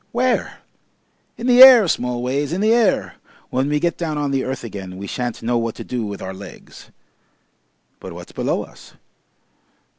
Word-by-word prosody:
"Where?" 250 +1 -1 0.8
"In 235 - -6
the 250 0 +5
air, 250 -6 +10
Smallways 125 +2 -2
in 180 - -2
the 220 +2 +3
air! 230 -5 +1 0.3
When 130 +2 0
we 150 0 +1
get 170 +2 -1
down 160 -3 -3
on 145 -1 -2
the 135 -1 0
earth 130 0 -5
again 95 -5 -8
we 100 - -7
shan't 120 +3 -5
know 120 +1 0
what 115 -1 -3
to - - -8
do 125 -2 -4
with 100 -1 -7
our 95 - -6
legs." 100 +1 -13 1.1
"But - - -9
what's - - -11
below - - -2
us?" - - -16
135 Hz, 175 wpm, -20 LUFS, 115-185 Hz, 1.1 s, air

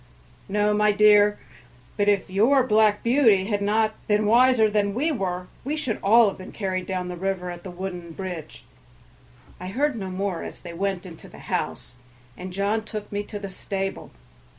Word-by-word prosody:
"No, 210 +1 +2
my 210 0 +3
dear; 210 0 +5 0.6
but 205 -1 +2
if 200 -2 +1
your 230 +8 +3
Black 215 -3 +3
Beauty 230 -6 +4
had 205 -1 -1
not 215 +2 +1
been 210 0 +2
wiser 240 +1 +5
than 205 -1 0
we 300 +7 +1
were 185 -8 -3 0.2
we 290 +4 -2
should 260 -8 -3
all 225 +3 +6
have 195 - -9
been 185 - -9
carried 185 -3 -3
down 185 -1 -3
the 180 - -5
river 180 0 -3
at 175 0 -9
the 190 - -7
wooden 180 -1 -6
bridge." 180 -2 -7 1.0
I 180 - -6
heard 275 +8 0
no 195 -4 -5
more, 185 -1 -3
as - - -9
they 170 -2 -8
went 190 +1 -2
into 170 -3 -11
the - - -14 0.2
house, - - -3 0.4
and 185 +1 -8
John 200 +4 -1
took 215 -1 -7
me 205 0 -2
to 210 - -7
the 200 -1 -6
stable. 195 0 -4
205 Hz, 185 wpm, -24 LUFS, 185-215 Hz, 1.0 s, all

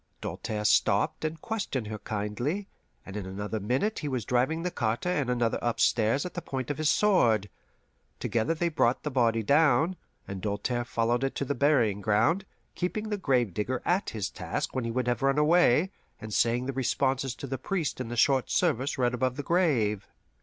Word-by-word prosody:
Doltaire 110 -1 -4
stopped 105 +9 +2
and 160 +1 -3
questioned 200 - -3
her 105 0 -6
kindly, 115 - -3 0.4
and 95 - -9
in 100 -3 -4
another 105 +3 -4
minute 130 - 0
he 150 - -4
was 130 -6 -2
driving 130 +7 +1
the 180 - -1
carter 115 +4 -1
and 145 -8 0
another 120 -2 +1
upstairs 115 +2 +2
at 180 - -6
the 175 - -4
point 130 -3 -4
of 145 - -5
his 155 -1 +2
sword. 115 - +3 0.7
Together 120 +8 0
they 170 +2 0
brought 130 -6 +1
the 150 - -2
body 115 -3 +2
down, 150 - +3 0.3
and 95 -1 -6
Doltaire 115 +4 -2
followed 120 +2 0
it 135 - -1
to 140 - -2
the 140 - -1
burying 125 -7 +2
ground; 115 - +2 0.3
keeping 210 +4 -3
the 210 - -1
gravedigger 125 - 0
at 180 +3 +1
his 105 -4 -4
task - - -4
when 130 -2 -2
he 115 - -2
would 125 +1 -1
have 120 +2 0
run 135 +1 +2
away, 160 +2 +4 0.3
and 110 -1 -7
saying 120 +3 +2
the 135 - -3
responses 135 0 0
to 145 - -7
the 135 -1 -4
priest 165 -3 -2
in 125 - -4
the 120 +1 -5
short 135 +1 +3
service 145 -5 +1
read 125 -1 +1
above 125 +1 0
the 145 - -4
grave. 130 - +1
130 Hz, 190 wpm, -28 LUFS, 115-155 Hz, 0.7 s, away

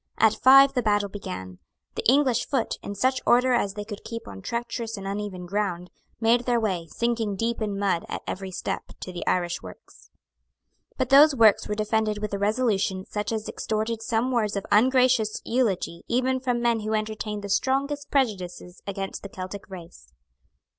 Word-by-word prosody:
At 220 -1 +5
five 275 +3 +7
the 250 - +1
battle 205 -2 +1
began. 95 - -7 0.3
The - - -4
English 265 -4 +2
foot, 265 -5 -1
in 200 - -6
such 260 +5 +1
order 250 +1 +4
as 205 -5 0
they 210 0 -5
could 205 -1 -8
keep 230 0 -7
on 95 -1 -9
treacherous 235 - -4
and 195 - -7
uneven 200 -2 -4
ground, 180 -2 -2 0.3
made 235 +2 +3
their 240 -1 +2
way, 185 -7 -2
sinking 230 0 -1
deep 230 +3 -2
in 205 -2 -2
mud 195 -4 0
at - - -5
every 190 0 -5
step, 185 - -3 0.2
to 185 - -6
the 175 - -5
Irish 175 -1 0
works. - - -14 0.9
But 260 -2 -1
those 285 +2 +7
works 220 -4 +5
were 210 - -2
defended 215 0 0
with 210 -1 -4
a 200 - -1
resolution 205 -3 0
such 210 +1 -3
as 220 -1 -3
extorted 220 +1 -2
some 230 +2 0
words 215 -4 0
of 200 - -3
ungracious 250 -1 +3
eulogy 210 -8 0
even 260 +2 +1
from 245 -2 -1
men 235 -1 +2
who 215 +1 -2
entertained 215 -1 -3
the 200 - -5
strongest 280 +6 0
prejudices 185 -9 -2
against 195 -1 -4
the 200 - -8
Celtic 190 +2 -7
race. 170 - -11
215 Hz, 180 wpm, -25 LUFS, 195-240 Hz, 0.9 s, five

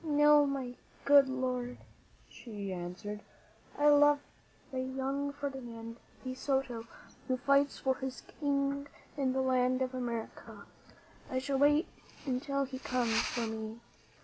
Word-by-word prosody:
"No, 295 -1 +6
my 260 -3 -3 0.3
good 280 -1 +7
lord," 255 -1 -2 0.5
she 205 -5 -6
answered; 180 +4 -5 0.6
"I 295 0 +5
love 290 0 +7 0.5
the 260 - -2
young 270 +2 -2
Ferdinand 240 -5 -6 0.3
de 255 -1 -3
Soto 260 -3 -1 0.4
who 255 - +1
fights 280 +2 +3
for 265 -1 0
his 265 -1 -5
King 280 -1 -1 0.3
in 270 -3 +1
the 265 - +1
land 255 0 +2
of 255 0 -3
America. 235 -3 -5 0.6
I 260 - -1
shall 270 +1 0
wait 295 +3 +5 0.4
until 275 +1 0
he 260 -1 -5
comes 250 -3 0
for 235 -1 0
me." 220 0 -5
260 Hz, 130 wpm, -32 LUFS, 245-280 Hz, 0.6 s, good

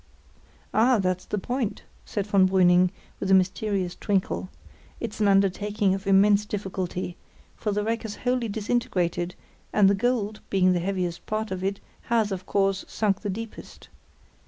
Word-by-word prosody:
"Ah! 240 +3 +4
that's 185 -2 -1
the 210 - -3
point," 245 +2 -2 0.2
said 205 -2 -2
von 195 -2 +4
Brüning, 180 -1 +5 0.3
with 190 - -2
a 190 - +7
mysterious 190 0 0
twinkle. 190 -2 -1 0.5
"It's 225 -2 -5
an 210 - +3
undertaking 200 +1 +2
of 195 +1 -4
immense 200 +1 +5
difficulty; 190 -4 -4 0.4
for 210 - -2
the 205 +1 0
wreck 225 +1 -1
is 220 -2 -5
wholly 250 -1 +1
disintegrated, 200 -5 -1 0.4
and 205 -2 +5
the 200 - +5
gold, 215 0 0
being 185 -2 +3
the 175 - +1
heaviest 180 -1 -3
part 215 0 -2
of 185 0 -3
it, 195 +1 -1 0.3
has, 225 -3 +1
of 185 -1 -5
course, 195 -1 +1
sunk 205 -3 0
the 205 - -3
deepest. 225 +3 -8
200 Hz, 160 wpm, -26 LUFS, 185-215 Hz, 0.5 s, a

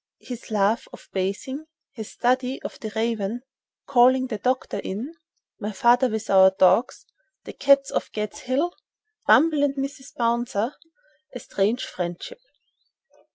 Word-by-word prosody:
—His 245 -2 -9
love 210 +1 +1
of - - -13
bathing.—His 260 +5 -5
study 255 +1 0
of - - -7
the 220 - -6
raven.—Calling 240 +3 0
the 215 -4 -4
doctor 255 +3 -1
in.—My 260 - -8
father 245 +5 +4
with 220 -1 -4
our 190 -1 +7
dogs.—The 260 - 0
cats 275 0 +3
of - - -2
"Gad's 210 -1 -4
Hill."—"Bumble" 325 - 0
and 285 -1 +1
"Mrs. 275 -1 -6
Bouncer."—A 250 - -3
strange 215 +3 -1
friendship. 180 - -6
250 Hz, 110 wpm, -24 LUFS, 215-280 Hz, -, our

